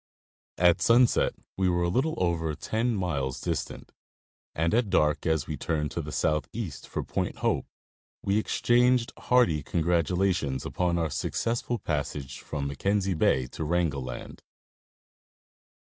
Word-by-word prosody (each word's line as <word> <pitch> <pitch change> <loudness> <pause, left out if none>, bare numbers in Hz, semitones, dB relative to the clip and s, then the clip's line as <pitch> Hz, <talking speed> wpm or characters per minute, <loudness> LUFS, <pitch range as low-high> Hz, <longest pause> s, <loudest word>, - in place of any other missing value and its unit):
At 90 -1 +4
sunset 120 +1 +4 0.2
we 95 -1 +2
were 85 0 +1
a - - +2
little 135 - +1
over 80 -3 0
ten 115 +7 -1
miles 70 -9 -2
distant, - - -4 0.6
and 80 +2 +1
at 115 -2 +2
dark, 75 -4 +2
as 80 -4 +1
we - - -4
turned 75 -2 -1
to - - -3
the - - -7
southeast 75 +2 -2
for - - -3
Point - - -2
Hope, - - +1 0.6
we 100 +2 +2
exchanged 120 +2 +2
hearty 120 -12 +3
congratulations 85 -2 0
upon 90 -1 0
our 80 -3 -1
successful 120 - -1
passage 70 - -3
from 70 -2 -4
Mackenzie 95 +8 0
Bay 65 -5 +2
to 80 - -5
Wrangel 80 -3 0
land. 65 -1 -7
85 Hz, 135 wpm, -28 LUFS, 75-105 Hz, 0.6 s, At